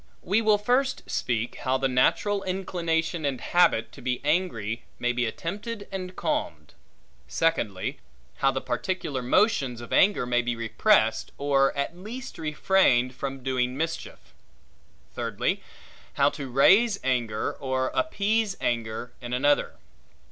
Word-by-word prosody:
We 200 +5 +2
will 215 -2 +4
first 250 +6 +1
speak 120 -1 -2
how 130 0 0
the 135 0 +1
natural 195 +11 +2
inclination 170 -3 -1
and 140 -3 -1
habit 175 -9 +2
to - - -13
be 125 0 -1
angry, 145 - 0 0.2
may 120 - 0
be 120 -1 0
attempted 205 - -5
and 185 -1 -5
calmed. - - -3 0.5
Secondly, 105 - -1 0.4
how 135 - +3
the 135 0 -2
particular 170 -8 -2
motions 130 - +2
of 120 - -8
anger 195 -9 +4
may 120 0 +2
be 120 0 -2
repressed, 115 -2 +2
or 140 -1 +3
at 140 +4 -2
least 230 +8 -8
refrained 150 -5 +2
from 135 0 -5
doing 130 -1 -1
mischief. 165 +2 -5 0.8
Thirdly, - - -1 0.5
how - - +4
to 135 - -6
raise 195 - +5
anger, 120 -5 0
or 130 -1 -2
appease 220 -9 0
anger 115 0 -2
in 120 0 -6
another. 145 +3 +2
140 Hz, 135 wpm, -26 LUFS, 125-190 Hz, 0.8 s, raise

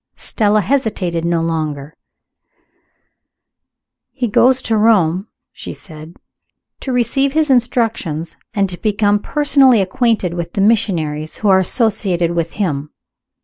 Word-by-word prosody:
Stella 215 -1 0
hesitated 195 -8 -1
no 170 -1 0
longer. 155 -2 -4 2.1
"He 250 -3 -3
goes 255 +4 +3
to 225 - 0
Rome," 200 -4 +2 0.2
she - - -9
said 155 0 -13 0.6
"to 265 - -5
receive 270 +3 0
his 310 -2 +1
instructions, 225 - -1 0.2
and 200 -1 0
to 175 - -7
become 205 -1 +1
personally 275 -2 +3
acquainted 195 -2 0
with 170 -1 -5
the 200 - -1
missionaries 170 -8 0
who - - +4
are 190 -1 +5
associated 190 -4 0
with 170 -1 -2
him. 150 -8 -3
200 Hz, 120 wpm, -17 LUFS, 165-230 Hz, 2.1 s, are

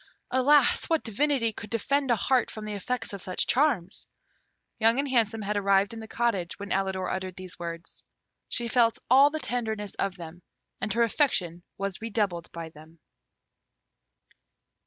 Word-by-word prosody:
Alas! 265 +2 +4
what 325 -2 +2
divinity 230 0 0
could 210 - -8
defend 270 +5 0
a 240 - +5
heart 255 +3 +2
from 215 -1 -7
the 210 - -4
effects 225 +3 -3
of 200 - -6
such 185 0 -1
charms!" 240 - +1 0.7
Young 225 +2 +4
and 280 +1 0
Handsome 225 -4 +1
had 210 +1 -2
arrived 200 +1 +3
in 225 - -7
the 220 - -8
cottage 220 -7 -1
when 200 0 -7
Alidor 190 -1 0
uttered 185 -1 -3
these 185 -1 -8
words. 170 0 -7 0.5
She 240 -1 -1
felt 230 -1 +3
all 275 +3 +8
the 315 - -3
tenderness 220 -6 -3
of 195 -2 0
them, 170 0 -10 0.4
and 215 - -1
her 235 +1 +3
affection 190 - +1 0.2
was 195 -1 -3
redoubled 205 -7 -2
by 165 -1 -7
them. 155 +1 -16
215 Hz, 160 wpm, -27 LUFS, 185-245 Hz, 0.7 s, all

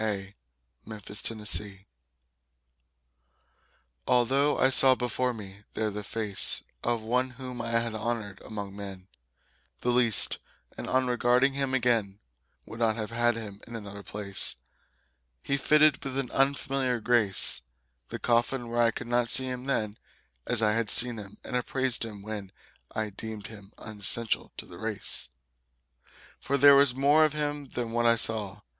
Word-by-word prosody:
Inferential 105 -1 -2 2.2
Although 135 +4 +1
I 130 - +2
saw 130 0 +6
before 125 +1 -2
me 100 -3 -11
there 110 -1 -2
the 105 +1 -6
face 105 -1 +2 0.2
Of 120 -2 -2
one 125 +3 -1
whom 125 -2 -8
I 115 - -5
had 115 -1 -1
honored 110 -3 -5
among 100 -2 -8
men 95 -2 -10 0.7
The 125 - 0
least, 120 -4 +5 0.4
and - - -8
on 130 0 0
regarding 125 +2 +1
him 135 -1 -2
again 115 -6 -1 0.5
Would 115 - -11
not 110 -2 +1
have 110 0 -6
had 120 0 0
him 105 -3 -9
in 115 - -10
another 100 -2 -9
place, 100 -1 +5 0.9
He 140 - -2
fitted 150 +1 +2
with 135 -1 -6
an 135 -3 -4
unfamiliar 135 -2 -1
grace 110 -4 +6 0.5
The - - -6
coffin 120 +1 -1
where 120 0 -1
I 115 - +3
could 120 - -7
not 120 0 -1
see 130 - +2
him 125 0 -6
then 110 -6 -3 0.5
As 115 -2 0
I 105 - +2
had 115 -1 -2
seen 120 -1 +5
him 100 -1 -12
and - - -7
appraised 130 0 -2
him 105 -3 -9
when 105 -3 -8 0.4
I 110 -1 -4
deemed 110 +1 -9
him 100 -3 -13
unessential 110 +1 -2
to - - -7
the - - -14
race. - - 0 1.1
For 140 - -2
there 140 +1 +7
was 140 -2 +3
more 145 +4 +3
of 155 -1 +1
him 145 -1 -4
than 120 -2 -5
what 120 0 0
I 115 - +4
saw. 105 -3 0
115 Hz, 150 wpm, -27 LUFS, 105-130 Hz, 2.2 s, there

